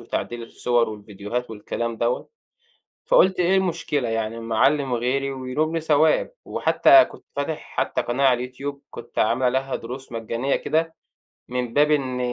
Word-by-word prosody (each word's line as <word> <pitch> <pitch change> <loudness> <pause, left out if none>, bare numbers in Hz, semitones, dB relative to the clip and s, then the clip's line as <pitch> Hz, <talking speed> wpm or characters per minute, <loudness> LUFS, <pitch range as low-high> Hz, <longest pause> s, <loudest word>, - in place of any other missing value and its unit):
وتعديل 120 -1 -4
الصور 120 0 0
والفيديوهات 105 +3 -5
والكلام 115 +2 -4
دوّة، 120 +2 -1 0.8
فقُلت: 190 - +4
"إيه 180 +2 +3
المشكلة 155 -8 -1
يعني 115 0 -2
اما 115 -1 -4
اعلّم 140 +1 +3
غيري 130 +3 0
وينُوبني 150 +5 -2
ثواب؟" 155 - +3
وحتى 335 -1 +5
كنت - - -14
فاتِح 145 +2 -2 0.2
حتى - - 0
قناة 130 +3 0
على 125 0 +2
الYouTube، 140 +2 -5
كنت 120 0 -7
عامِل 115 +4 +2
عليها 130 +1 +1
دُرُوس 130 +3 -8
مَجَّانية 115 +4 -1
كده 160 +1 -1 0.5
من 125 -2 -3
باب 150 +1 +4
إن 130 -4 0
130 Hz, 145 wpm, -23 LUFS, 115-150 Hz, 0.8 s, وحتى